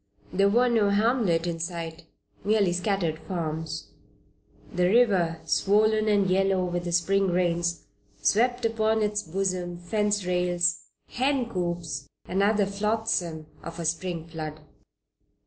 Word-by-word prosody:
There 195 Hz, +2 st, +4 dB
was 240 Hz, +4 st, +3 dB
no 215 Hz, -3 st, +3 dB
hamlet 205 Hz, -5 st, +2 dB
in 170 Hz, -1 st, -3 dB
sight, 165 Hz, -1 st, -5 dB, 0.4 s
merely 205 Hz, -3 st, +2 dB
scattered 180 Hz, -4 st, -1 dB
farms. 160 Hz, -2 st, -4 dB, 0.8 s
The 180 Hz, 0 st, +2 dB
river, 190 Hz, -8 st, +3 dB
swollen 215 Hz, +2 st, +2 dB
and 205 Hz, -2 st, +3 dB
yellow 190 Hz, 0 st, +2 dB
with 175 Hz, 0 st, -3 dB
the 175 Hz, -, -2 dB
Spring 195 Hz, +3 st, +2 dB
rains, 175 Hz, -1 st, 0 dB, 0.3 s
swept 245 Hz, +3 st, +2 dB
upon 220 Hz, -1 st, +1 dB
its 210 Hz, 0 st, 0 dB
bosom 180 Hz, -1 st, -2 dB
fence 205 Hz, +2 st, 0 dB
rails, 175 Hz, -2 st, +1 dB, 0.2 s
hen 260 Hz, -1 st, 0 dB
coops, 175 Hz, -7 st, -3 dB, 0.2 s
and 190 Hz, +2 st, 0 dB
other 205 Hz, 0 st, +3 dB
flotsam 200 Hz, -5 st, -1 dB, 0.2 s
of 165 Hz, -, -8 dB
a 170 Hz, -, -3 dB
Spring 165 Hz, 0 st, -2 dB
flood. 155 Hz, -2 st, -7 dB
185 Hz, 130 wpm, -26 LUFS, 170-210 Hz, 0.8 s, There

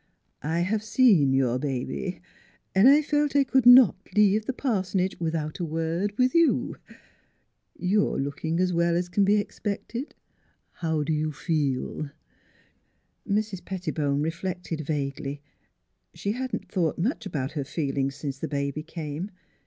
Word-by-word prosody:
I 160 Hz, +4 st, -1 dB
have 205 Hz, +4 st, 0 dB
seen 210 Hz, -, +4 dB
your 130 Hz, -2 st, +2 dB
ba 130 Hz, -3 st, -2 dB
by 70 Hz, -2 st, -5 dB, 0.5 s
an' 195 Hz, +6 st, +6 dB
I 290 Hz, +3 st, +7 dB
felt 295 Hz, -1 st, 0 dB
I 280 Hz, -, +6 dB
could 265 Hz, -1 st, +2 dB
not 245 Hz, -4 st, +9 dB, 0.2 s
leave 210 Hz, +1 st, +4 dB
the -, -, +1 dB
pars'nage 190 Hz, -7 st, -1 dB
without 160 Hz, 0 st, -2 dB
a -, -, -2 dB
word 165 Hz, +6 st, -2 dB
with 255 Hz, 0 st, +3 dB
you.... 335 Hz, -2 st, +2 dB, 1.0 s
You 200 Hz, +3 st, +2 dB
are -, -, -3 dB
lookin' 160 Hz, +4 st, -2 dB
as 180 Hz, 0 st, +1 dB
well 170 Hz, 0 st, +2 dB
's 175 Hz, +1 st, -1 dB
c'n 200 Hz, +2 st, +2 dB
be 205 Hz, +2 st, +4 dB
expected. 210 Hz, +5 st, -4 dB, 0.6 s
How 160 Hz, -3 st, -1 dB
do 155 Hz, -, -1 dB
you 155 Hz, 0 st, 0 dB
feel? 145 Hz, -2 st, -2 dB, 0.6 s
" -, -, -29 dB
Mrs. 200 Hz, -3 st, -1 dB
Pettibone 150 Hz, -7 st, -1 dB
reflected 170 Hz, 0 st, -3 dB
vaguely. 140 Hz, -1 st, -3 dB, 0.7 s
She 200 Hz, -, -2 dB
had 255 Hz, +3 st, -3 dB
not -, -, -3 dB
thought 170 Hz, -5 st, 0 dB
much 215 Hz, -, -1 dB
about 140 Hz, -7 st, -3 dB
her 145 Hz, -3 st, -3 dB
feelings 135 Hz, -2 st, -2 dB
since 140 Hz, -2 st, -5 dB
the 160 Hz, -, -3 dB
baby 140 Hz, 0 st, -2 dB
came. 160 Hz, +2 st, -5 dB
170 Hz, 155 wpm, -26 LUFS, 150-205 Hz, 1.0 s, not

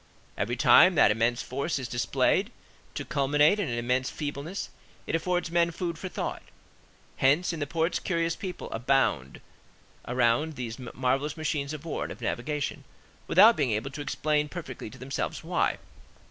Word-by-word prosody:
Every -, -, -1 dB
time -, -, +6 dB
that -, -, +6 dB
immense 115 Hz, +3 st, +1 dB
force 140 Hz, +6 st, -2 dB
is 130 Hz, -3 st, -4 dB
displayed 120 Hz, 0 st, +1 dB, 0.4 s
to -, -, -4 dB
culminate 150 Hz, +7 st, +3 dB
in 190 Hz, -8 st, -1 dB
an 120 Hz, -, -2 dB
immense 125 Hz, +2 st, 0 dB
feebleness 150 Hz, +5 st, -5 dB, 0.4 s
it -, -, -4 dB
affords 175 Hz, +1 st, 0 dB
men 170 Hz, 0 st, +3 dB
food 170 Hz, -1 st, -4 dB
for 185 Hz, -, -5 dB
thought. -, -, -4 dB, 0.8 s
Hence 150 Hz, +7 st, +3 dB
in 165 Hz, -, -5 dB
the 145 Hz, -, -2 dB
ports 165 Hz, +3 st, 0 dB
curious 170 Hz, -2 st, -1 dB
people 185 Hz, -4 st, -6 dB
abound 115 Hz, -, 0 dB, 0.7 s
around 125 Hz, +5 st, +1 dB
these 120 Hz, -1 st, -5 dB
marvellous 130 Hz, +4 st, -1 dB
machines 150 Hz, -2 st, -2 dB
of 155 Hz, 0 st, -7 dB
war 160 Hz, -, -3 dB
and -, -, -3 dB
of -, -, -9 dB
navigation, 145 Hz, +3 st, -3 dB, 0.4 s
without -, -, +7 dB
being -, -, +1 dB
able 110 Hz, +6 st, -2 dB
to 140 Hz, +2 st, -6 dB
explain 150 Hz, +2 st, 0 dB
perfectly 140 Hz, -11 st, -7 dB
to 130 Hz, -, -13 dB
themselves 130 Hz, +1 st, -4 dB
why. -, -, 0 dB
145 Hz, 160 wpm, -28 LUFS, 125-165 Hz, 0.8 s, without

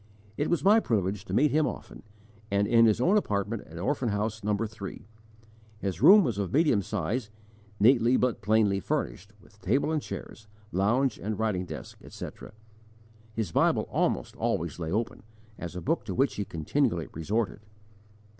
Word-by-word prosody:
It 145 Hz, -, -1 dB
was 170 Hz, -, +1 dB
my 210 Hz, +4 st, +6 dB
privilege 100 Hz, -, -1 dB
to -, -, -6 dB
meet 150 Hz, +1 st, +4 dB
him 155 Hz, 0 st, +2 dB
often, -, -, -7 dB, 0.5 s
and 100 Hz, 0 st, +2 dB
in 115 Hz, +1 st, +5 dB
his 110 Hz, 0 st, +2 dB
own 185 Hz, +11 st, +4 dB
apartment 105 Hz, -, -2 dB
at 80 Hz, -, -11 dB
Orphan 125 Hz, -, -1 dB
House 105 Hz, +1 st, -2 dB
No. 105 Hz, 0 st, +1 dB
3. 105 Hz, -3 st, -6 dB, 0.7 s
His 95 Hz, -3 st, -4 dB
room 195 Hz, +8 st, +8 dB
was 115 Hz, -8 st, -1 dB
of 100 Hz, -3 st, -2 dB
medium 145 Hz, -8 st, +3 dB
size, 105 Hz, +4 st, -3 dB, 0.5 s
neatly 120 Hz, +2 st, +5 dB
but 125 Hz, -3 st, 0 dB
plainly 105 Hz, -2 st, +2 dB
furnished, 90 Hz, -, -3 dB
with 105 Hz, 0 st, -22 dB
table 130 Hz, +11 st, +1 dB
and 155 Hz, -2 st, 0 dB
chairs, 110 Hz, -5 st, -8 dB, 0.2 s
lounge 120 Hz, +8 st, +1 dB
and 105 Hz, 0 st, -3 dB
writing 105 Hz, -5 st, -1 dB
desk, -, -, -9 dB
etc. -, -, -9 dB, 0.8 s
His 110 Hz, -7 st, -2 dB
Bible -, -, +2 dB
almost -, -, 0 dB
always -, -, -2 dB
lay 80 Hz, -2 st, -3 dB
open, 110 Hz, +4 st, -2 dB, 0.4 s
as 85 Hz, 0 st, -6 dB
a 90 Hz, -, -4 dB
book 165 Hz, -, 0 dB
to 95 Hz, -, -4 dB
which 135 Hz, -2 st, +2 dB
he 100 Hz, 0 st, -3 dB
continually 85 Hz, -, -1 dB
resorted. 105 Hz, +8 st, -2 dB
110 Hz, 165 wpm, -28 LUFS, 100-125 Hz, 0.8 s, room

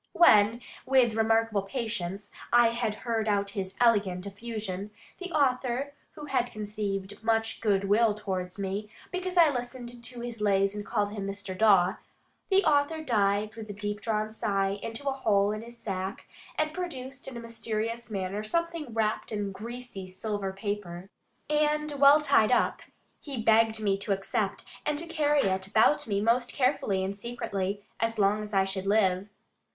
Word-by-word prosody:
When, 225 Hz, -8 st, +6 dB, 0.2 s
with 255 Hz, -4 st, +4 dB
remarkable 225 Hz, -1 st, +2 dB
patience, 205 Hz, -3 st, -4 dB, 0.2 s
I 240 Hz, -1 st, +6 dB
had 230 Hz, -2 st, -1 dB
heard 225 Hz, -2 st, 0 dB
out 200 Hz, -1 st, +1 dB
his 195 Hz, -1 st, -4 dB
elegant 205 Hz, -6 st, +3 dB
effusion, 205 Hz, -2 st, -5 dB, 0.3 s
the 370 Hz, -1 st, -6 dB
author, 270 Hz, -2 st, +1 dB, 0.2 s
who 295 Hz, -, -8 dB
had 245 Hz, -4 st, 0 dB
conceived 205 Hz, -1 st, -4 dB
much 225 Hz, 0 st, 0 dB
good 200 Hz, -3 st, +2 dB
will 210 Hz, +2 st, +3 dB
towards 185 Hz, -3 st, -4 dB
me, 200 Hz, +2 st, -3 dB, 0.2 s
because 365 Hz, 0 st, -3 dB
I 330 Hz, -3 st, +7 dB
listened 245 Hz, -1 st, -6 dB
to 240 Hz, 0 st, -6 dB
his 235 Hz, -2 st, -6 dB
lays 195 Hz, -1 st, +3 dB
and 205 Hz, 0 st, -5 dB
called 205 Hz, 0 st, -1 dB
him 200 Hz, -2 st, -4 dB
Mr. 195 Hz, -1 st, -5 dB
Dawe, 195 Hz, -3 st, +4 dB, 0.5 s
the 390 Hz, 0 st, +4 dB
author 310 Hz, +1 st, +2 dB
dived 210 Hz, -4 st, +1 dB
with 220 Hz, -2 st, -9 dB
a -, -, -4 dB
deep 205 Hz, +1 st, -4 dB
drawn 215 Hz, -1 st, -1 dB
sigh 200 Hz, -3 st, 0 dB
into 230 Hz, +5 st, -5 dB
a -, -, +3 dB
hole 210 Hz, -6 st, +2 dB
in 215 Hz, 0 st, -4 dB
his 235 Hz, +1 st, -8 dB
sack, 195 Hz, +1 st, -4 dB, 0.3 s
and 310 Hz, 0 st, 0 dB
produced 275 Hz, -6 st, -6 dB
in 260 Hz, -3 st, -6 dB
a -, -, -5 dB
mysterious 230 Hz, 0 st, -4 dB
manner 200 Hz, 0 st, -3 dB
something 335 Hz, +2 st, -2 dB
wrapped 220 Hz, 0 st, -1 dB
in 205 Hz, -2 st, -2 dB
greasy 230 Hz, -1 st, -7 dB
silver 195 Hz, +1 st, -3 dB
paper, 195 Hz, -2 st, -5 dB, 0.4 s
and 300 Hz, 0 st, +1 dB
well 285 Hz, +2 st, +8 dB
tied 275 Hz, -7 st, +4 dB
up. 245 Hz, -, +2 dB, 0.4 s
He 275 Hz, -5 st, -6 dB
begged 225 Hz, 0 st, +4 dB
me 200 Hz, -2 st, +1 dB
to 200 Hz, 0 st, 0 dB
accept, 195 Hz, 0 st, -2 dB, 0.2 s
and 295 Hz, -, 0 dB
carry 295 Hz, -3 st, +2 dB
it 190 Hz, -1 st, 0 dB
about 220 Hz, +8 st, +3 dB
me 200 Hz, -2 st, 0 dB
most 240 Hz, +3 st, +2 dB
carefully 255 Hz, -8 st, +1 dB
and 195 Hz, +1 st, -3 dB
secretly, 200 Hz, -3 st, -3 dB, 0.2 s
as 225 Hz, +1 st, 0 dB
long 205 Hz, +1 st, +3 dB
as 210 Hz, 0 st, -7 dB
I 195 Hz, -2 st, +3 dB
should 190 Hz, 0 st, -4 dB
live. 195 Hz, -2 st, +2 dB
215 Hz, 165 wpm, -28 LUFS, 200-245 Hz, 0.5 s, well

